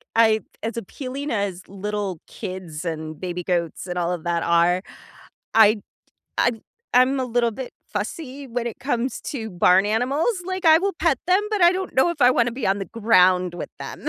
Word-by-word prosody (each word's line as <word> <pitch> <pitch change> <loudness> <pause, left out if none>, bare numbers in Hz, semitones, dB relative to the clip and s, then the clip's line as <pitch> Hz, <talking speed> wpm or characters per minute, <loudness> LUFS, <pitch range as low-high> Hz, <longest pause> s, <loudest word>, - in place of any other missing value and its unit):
I 220 -1 +5 0.2
as 225 +1 -3
appealing 265 +6 -5
as 200 -4 -2
little 200 -2 -4
kids 185 -5 -7
and 155 -2 -5
baby 180 -1 -4
goats 170 -1 -2
and 180 0 -4
all 175 0 0
of 175 -3 -4
that 170 -1 0
are, 170 +2 +3 0.7
I 220 -1 +7
t 210 - -10 0.6
I - - +4 0.4
I'm 255 +2 +4
a 260 - 0
little 240 -1 +1
bit 260 +3 -7 0.2
fussy 270 - -5
when 240 0 -3
it 235 - -5
comes 255 -1 -2
to 225 -6 -5
barn 180 +1 +4
animals, 260 - +1
like, 375 0 -4
I 320 -1 +7
will 395 +3 0
pet 315 -4 +2
them, 370 +2 +5
but 420 -4 0
I 345 - +8
don't 375 0 -4
know 265 +6 +4
if 330 - -6
I 250 -1 +7
wanna 240 -1 +2
be 255 0 -3
on 195 +1 +2
the 195 - -3
ground 185 -6 +3
with 175 - -5
them. - - -6
225 Hz, 195 wpm, -23 LUFS, 180-265 Hz, 0.7 s, I